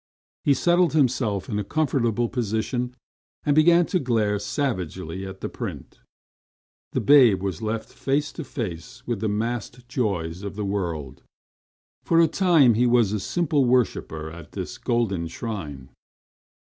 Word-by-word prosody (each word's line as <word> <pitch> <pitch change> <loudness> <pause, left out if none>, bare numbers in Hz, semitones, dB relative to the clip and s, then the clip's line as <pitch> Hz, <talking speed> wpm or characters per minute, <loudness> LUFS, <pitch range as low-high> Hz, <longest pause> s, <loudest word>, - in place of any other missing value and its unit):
He 140 - +4
settled 175 +3 +3
himself 120 -9 +1
in 105 - -2
a - - -1
comfortable 120 -3 0
position, 120 +1 -2 0.5
and 145 -1 +2
began 170 +2 +6
to 185 - 0
glare 110 -7 +1
savagely 95 - -3
at 95 0 -10
the - - -2
print. - - -7 0.9
The - - +1
babe 125 -10 +6
was 95 -5 -3
left 110 0 -3
face 145 +2 -1
to 165 - -6
face 90 - -6
with 120 -4 -2
the 110 +1 -1
massed 120 +3 -3
joys 95 -9 -2
of 100 -1 -6
the 105 -1 -3
world. 85 -9 -3 0.8
For 165 - +3
a 165 - +6
time 160 -7 +4
he 120 +3 +3
was 120 -4 +3
a 105 - 0
simply 150 - +1
worshipper 105 -11 0
at 85 -2 -12
this - - -6
golden 100 -8 0
shrine. 80 - -6
115 Hz, 145 wpm, -24 LUFS, 95-135 Hz, 0.9 s, began